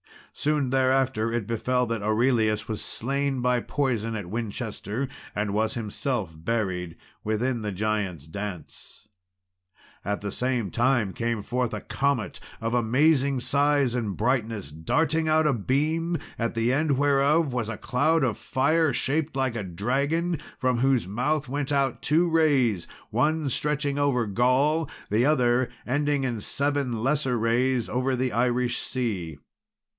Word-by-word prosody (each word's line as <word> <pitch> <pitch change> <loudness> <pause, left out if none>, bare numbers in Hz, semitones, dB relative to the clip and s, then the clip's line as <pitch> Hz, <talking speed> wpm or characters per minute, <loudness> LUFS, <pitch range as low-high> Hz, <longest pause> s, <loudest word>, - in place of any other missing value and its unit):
Soon 145 -3 0
thereafter 130 -3 +2
it 115 -3 -1
befell 125 +3 0
that 115 -2 -3
Aurelius 110 0 +1
was 110 -2 -3
slain 135 +1 -1
by 125 0 +2
poison 115 -4 -1
at 105 -4 -4
Winchester, 115 +2 -3 0.3
and 105 -1 -1
was 110 +1 0
himself 110 - -2
buried 90 -2 -2 0.3
within 115 +3 -1
the 105 -1 -3
Giants' 100 -6 -2
Dance. 95 +2 -8 0.9
At 105 +1 -2
the 100 0 -4
same 125 -5 -1
time 120 -5 +2
came 115 -3 -2
forth 125 +1 -1
a - - -4
comet 140 -5 -1 0.2
of 115 +1 -2
amazing 135 +3 +3
size 140 -2 +2
and 110 -6 -2
brightness, 115 - -1
darting 160 - 0
out 155 0 +3
a 150 - +3
beam, 155 - 0 0.2
at 115 0 -1
the 115 +2 +2
end 145 -1 +1
whereof 145 +1 +3
was 120 -3 -1
a 115 - -4
cloud 145 +6 +1
of 120 -5 0
fire 155 +2 +1
shaped 150 +4 -1
like 130 -3 0
a 105 - -3
dragon, 140 - -1 0.2
from 125 -2 +1
whose 130 -3 +2
mouth 135 +8 -1
went 140 +2 -3
out 140 -3 +1
two 165 +4 +3
rays, 140 - +2 0.2
one 150 +5 +1
stretching 145 +1 0
over 135 -5 +2
Gaul, 130 +8 +2 0.2
the 110 +4 +3
other 125 -4 +3 0.2
ending 145 +1 0
in 120 -4 -1
seven 140 -3 -1
lesser 135 -2 +1
rays 120 +2 +1
over 130 +1 0
the 130 0 -1
Irish 120 +2 +1
sea. 95 - -3
125 Hz, 145 wpm, -26 LUFS, 110-140 Hz, 0.9 s, amazing